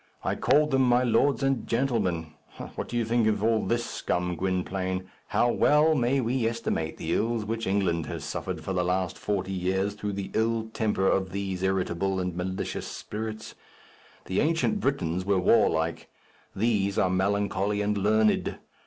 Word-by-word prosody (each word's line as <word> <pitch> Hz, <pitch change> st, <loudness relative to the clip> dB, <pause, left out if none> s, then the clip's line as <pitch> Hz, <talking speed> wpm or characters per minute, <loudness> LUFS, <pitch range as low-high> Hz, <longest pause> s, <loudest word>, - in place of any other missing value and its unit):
I -, -, 0 dB
called 150 Hz, +1 st, +3 dB
them 135 Hz, 0 st, +3 dB
my 125 Hz, -1 st, +4 dB
lords 135 Hz, +3 st, +2 dB
and 135 Hz, -3 st, 0 dB
gentlemen. 100 Hz, -, 0 dB, 0.4 s
What -, -, -5 dB
do 120 Hz, -, -3 dB
you 115 Hz, -, +1 dB
think 115 Hz, 0 st, +2 dB
of 105 Hz, -1 st, +1 dB
all 110 Hz, -1 st, +2 dB
this 120 Hz, 0 st, 0 dB
scum, 90 Hz, 0 st, -2 dB
Gwynplaine? 95 Hz, 0 st, -2 dB, 0.2 s
How 120 Hz, -, +2 dB
well 150 Hz, +5 st, +4 dB
may 130 Hz, -1 st, +2 dB
we 120 Hz, -1 st, 0 dB
estimate 115 Hz, -8 st, -2 dB
the -, -, -2 dB
ills 115 Hz, -1 st, 0 dB
which 115 Hz, 0 st, -3 dB
England 95 Hz, -4 st, 0 dB
has -, -, -5 dB
suffered -, -, -4 dB
for 95 Hz, -, -3 dB
the 90 Hz, -1 st, +1 dB
last 90 Hz, 0 st, 0 dB
forty 95 Hz, -2 st, -2 dB
years 95 Hz, +2 st, 0 dB
through 105 Hz, 0 st, -4 dB
the 100 Hz, -1 st, -5 dB
ill 110 Hz, 0 st, 0 dB
temper 105 Hz, -3 st, 0 dB
of 95 Hz, -1 st, +1 dB
these 95 Hz, -1 st, -3 dB
irritable 95 Hz, 0 st, 0 dB
and 90 Hz, -2 st, -2 dB
malicious 95 Hz, +1 st, -3 dB
spirits! 110 Hz, 0 st, -6 dB, 0.7 s
The 95 Hz, -, -1 dB
ancient 165 Hz, +6 st, +1 dB
Britons 95 Hz, -, -1 dB
were 100 Hz, 0 st, +2 dB
warlike; 85 Hz, -5 st, +2 dB, 0.5 s
these 100 Hz, -2 st, +1 dB
are 90 Hz, -, +3 dB
melancholy 100 Hz, +1 st, 0 dB
and 105 Hz, +1 st, 0 dB
learned. 110 Hz, +2 st, +2 dB
100 Hz, 165 wpm, -27 LUFS, 95-115 Hz, 0.7 s, my